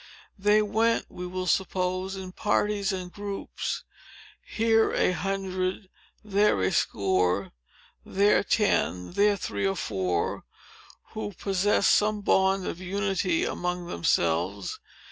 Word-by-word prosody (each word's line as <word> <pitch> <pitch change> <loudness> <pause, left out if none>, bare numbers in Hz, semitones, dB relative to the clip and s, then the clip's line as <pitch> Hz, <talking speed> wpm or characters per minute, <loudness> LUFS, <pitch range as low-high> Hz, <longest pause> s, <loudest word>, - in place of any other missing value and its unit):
They 210 +2 +4
went, 225 +2 +1
we 180 0 -7
will 185 0 -4
suppose, 185 +1 0
in 190 -1 -7
parties 205 0 0
and 180 -2 -5
groups, 200 -1 -4 0.6
here 225 0 +2
a - - +2
hundred, 190 0 -2 0.3
there 205 - +2
a 95 - +2
score, 95 -1 +1 0.5
there 200 +2 +3
ten, 90 - +1
there 205 0 +3
three 195 - -2
or 195 - 0
four, 95 - -2 0.7
who 210 -1 -5
possessed 195 +2 +2
some 210 0 +2
bond 190 -1 +2
of 175 - -5
unity 190 -2 0
among 180 0 -3
themselves. 85 - 0
190 Hz, 115 wpm, -27 LUFS, 180-205 Hz, 0.7 s, They